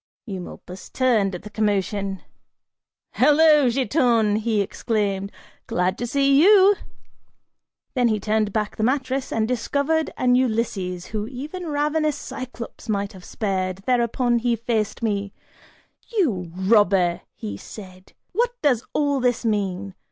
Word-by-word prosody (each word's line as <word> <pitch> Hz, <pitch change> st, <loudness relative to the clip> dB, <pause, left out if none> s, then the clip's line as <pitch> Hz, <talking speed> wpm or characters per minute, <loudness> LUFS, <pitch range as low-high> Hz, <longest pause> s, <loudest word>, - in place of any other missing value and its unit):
Eumolpus 185 Hz, -2 st, -8 dB
turned 220 Hz, -7 st, +1 dB
at 175 Hz, -, -8 dB
the 210 Hz, -, -8 dB
commotion. 200 Hz, -2 st, -1 dB, 0.9 s
"Hello, 300 Hz, 0 st, +5 dB
Giton," 240 Hz, -5 st, +2 dB
he 220 Hz, -1 st, 0 dB
exclaimed, 200 Hz, -1 st, -1 dB, 0.4 s
"glad 180 Hz, +1 st, 0 dB
to 240 Hz, -, -2 dB
see 275 Hz, +2 st, +3 dB
you!" 400 Hz, +2 st, +7 dB, 1.2 s
Then 250 Hz, -3 st, +2 dB
he 215 Hz, -2 st, +1 dB
turned 215 Hz, +1 st, 0 dB
back 210 Hz, 0 st, -2 dB
the 215 Hz, -, -1 dB
mattress 260 Hz, +1 st, 0 dB
and 220 Hz, -1 st, 0 dB
discovered 280 Hz, +6 st, 0 dB
an 250 Hz, -1 st, +3 dB
Ulysses 220 Hz, -8 st, 0 dB
who 210 Hz, 0 st, -2 dB
even 295 Hz, +9 st, -6 dB
a -, -, -4 dB
ravenous 300 Hz, 0 st, 0 dB
Cyclops 255 Hz, -3 st, -8 dB
might 200 Hz, -1 st, -1 dB
have 185 Hz, -2 st, -13 dB
spared; 190 Hz, -2 st, -3 dB
thereupon, 240 Hz, -1 st, +1 dB
he 235 Hz, 0 st, +1 dB
faced 230 Hz, -1 st, -2 dB
me, 200 Hz, -2 st, -1 dB, 0.8 s
"You 195 Hz, -, 0 dB
robber," 190 Hz, -3 st, +3 dB, 0.4 s
said 185 Hz, -, -11 dB
he, -, -, -24 dB, 0.2 s
"what 485 Hz, +4 st, -1 dB
does 255 Hz, -5 st, +3 dB
all 285 Hz, -2 st, +1 dB
this 245 Hz, -1 st, 0 dB
mean? 200 Hz, -3 st, -1 dB
225 Hz, 130 wpm, -23 LUFS, 200-265 Hz, 1.2 s, you